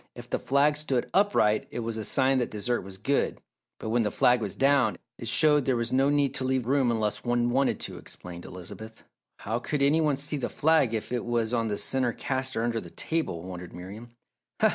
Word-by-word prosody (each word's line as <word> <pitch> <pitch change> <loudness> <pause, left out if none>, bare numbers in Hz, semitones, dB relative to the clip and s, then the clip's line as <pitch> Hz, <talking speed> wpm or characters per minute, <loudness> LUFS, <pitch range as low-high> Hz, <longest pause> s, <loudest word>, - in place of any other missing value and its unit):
If - - -10
the - - 0
flag 140 +3 +2
stood 135 -5 -1
upright 190 - +3
it 120 - -4
was 115 0 -3
a 110 - -3
sign 130 +4 +3
that 120 - -1
dessert 120 +3 -1
was 95 0 -8
good, 140 +8 0 0.4
but 110 - -5
when 120 +2 +2
the 105 - +1
flag 125 +3 +3
was 105 -3 -2
down, 135 -1 +3 0.2
it 115 - -6
showed 150 +3 +3
there 130 - +2
was 115 0 -1
no 135 +2 +3
need 145 -1 +2
to 135 - -1
leave 130 -2 0
room 135 0 +2
unless 110 -3 -1
one 120 0 +1
wanted 135 +2 +1
to," - - -5
explained 85 -1 -9
Elizabeth. 100 +5 -10 0.3
"How 115 +3 -3
could 140 +3 -1
any 150 +4 +4
one 150 -3 +2
see 145 +2 -1
the 135 - -3
flag 150 -7 +2
if 110 - -4
it 125 -1 -1
was 120 -1 -1
on 115 -2 +1
the 105 -1 -2
centre 130 0 0
caster 130 -2 -2
under 115 -1 -1
the - - -10
table?" 160 - -2
wondered 90 -1 -8
Miriam. 100 +7 -9
120 Hz, 215 wpm, -27 LUFS, 110-135 Hz, 0.4 s, any